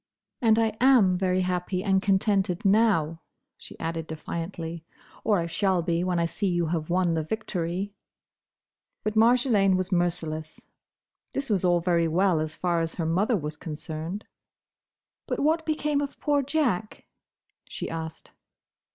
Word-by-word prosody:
And 225 -2 +4
I 225 -1 +1
am 245 -9 +5
very 185 0 +1
happy 180 0 -1
and 190 -2 +2
contented 195 -1 +1
now," 195 -7 +3 0.3
she - - -13
added 165 -1 -3
defiantly,—"or 165 +5 -4
I 170 - 0
shall 185 +1 +1
be, 170 0 0
when 180 -1 0
I 170 - +2
see 195 +4 -2
you 175 -2 +1
have 160 -1 -2
won 175 -1 +2
the 160 - 0
victory!" 185 +1 -3 1.1
But 215 - -1
Marjolaine 225 -4 +4
was 185 +1 -2
merciless. 165 -3 -1 0.7
This 275 -4 -2
was 195 -3 +1
all 175 -1 +3
very 170 -1 +2
well, 175 +1 +2
as 155 0 -3
far 175 -2 0
as 165 0 -3
her 165 - -2
mother 195 +8 +2
was 150 -2 -5
concerned. 160 +4 -6 1.0
"But - - -1
what 320 +2 +1
became 300 -2 0
of 285 - -5
poor 290 -1 +2
Jack?" 255 - -1 0.6
she - - -5
asked. 160 0 -6
180 Hz, 145 wpm, -26 LUFS, 165-215 Hz, 1.1 s, am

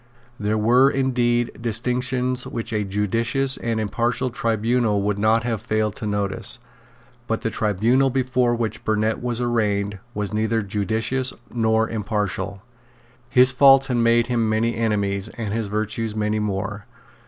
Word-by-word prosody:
There 105 +1 0
were 120 +5 +4
indeed 120 -3 +1
distinctions 125 +2 -1
which 115 -1 -5
a 105 -1 0
judicious 115 +7 +1
and 115 -1 -2
impartial 120 +4 -1
tribunal 115 -2 0
would 100 0 -1
not 110 +2 +3
have 115 -3 -2
failed 110 -1 -1
to 110 - -4
notice. 100 -1 -1 0.7
But 115 - -1
the 115 - -2
tribunal 115 +7 +2
before 125 -2 +1
which 115 -2 -3
Burnet 110 0 0
was 120 -1 -2
arraigned 105 -4 0 0.2
was 105 0 -3
neither 110 +1 0
judicious 110 +6 -1 0.2
nor 110 -1 +2
impartial. 105 -3 -3 0.7
His 125 +1 +5
faults 135 +1 +6
had 125 -3 -1
made 115 0 +3
him 120 -2 0
many 115 +2 +1
enemies, 100 -3 -1
and 110 -3 -3
his 110 -1 -2
virtues 110 +1 -3
many 105 0 0
more. 100 0 -3
115 Hz, 140 wpm, -22 LUFS, 105-120 Hz, 0.7 s, faults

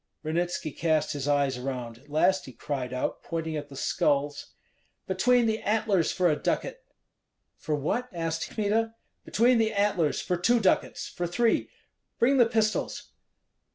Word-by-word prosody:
Ranitski 165 0 -2
cast 155 -2 +1
his 145 -1 -4
eyes 140 -3 +1
around; 125 -3 -5
at 145 +3 -23
last 180 +4 +2
he 130 - -10
cried 130 -3 -4
out, 130 0 -2
pointing 160 -1 -3
at 145 -1 -5
the 140 - -11
skulls, 145 +1 0 0.5
"Between 240 +6 +3
the 220 0 +1
antlers, 210 -5 +1
for 180 -1 +2
a 155 - +3
ducat!" - - -2 0.8
"For 155 - -1
what?" 235 - -2
asked 165 -2 -3
Kmita. 225 +1 0 0.3
"Between 240 +2 +3
the 220 -1 +1
antlers, 200 -6 +1
for 180 - -1
two 235 +7 +3
ducats, 195 -4 +1
for 175 - -4
three! 225 +7 +1 0.5
Bring 270 +4 +3
the 240 -3 +6
pistols!" 220 -2 -1
175 Hz, 155 wpm, -27 LUFS, 145-220 Hz, 0.8 s, the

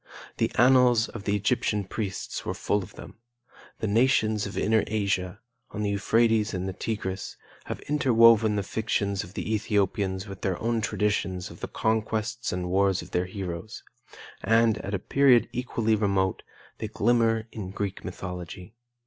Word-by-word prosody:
The - - +1
annals 125 -2 +5
of 105 -4 -9
the 100 - +1
Egyptian 105 0 0
priests 95 0 -4
were - - -3
full 105 - 0
of 95 +2 -11
them; - - -12 0.6
the - - 0
nations 110 -2 +2
of 100 - -7
inner 110 -1 +2
Asia, 100 -3 -1 0.3
on 105 - -4
the 100 - 0
Euphrates 110 +1 +2
and 90 +1 -3
Tigris, 100 -4 -4 0.3
have - - -5
interwoven 115 -6 +4
the 100 - 0
fictions 100 -1 -1
of 90 - -13
the 110 - -2
Ethiopians 100 -2 0
with 100 -1 -9
their 95 -3 -1
own 115 0 0
traditions 105 -4 -1
of - - -13
the - - -4
conquests 110 +1 -1
and 90 0 -3
wars 95 -1 +2
of 90 - -14
their 90 +1 0
heroes; 90 +1 -6 0.6
and, 115 -1 +3
at 100 +1 -3
a - - +1
period 125 +3 +4
equally 115 -3 0
remote, 100 -3 0 0.4
they 110 - -3
glimmer 115 +1 +1
in 100 -4 -6
Greek 100 0 -4
mythology. 90 +1 -7
105 Hz, 155 wpm, -27 LUFS, 95-115 Hz, 0.6 s, annals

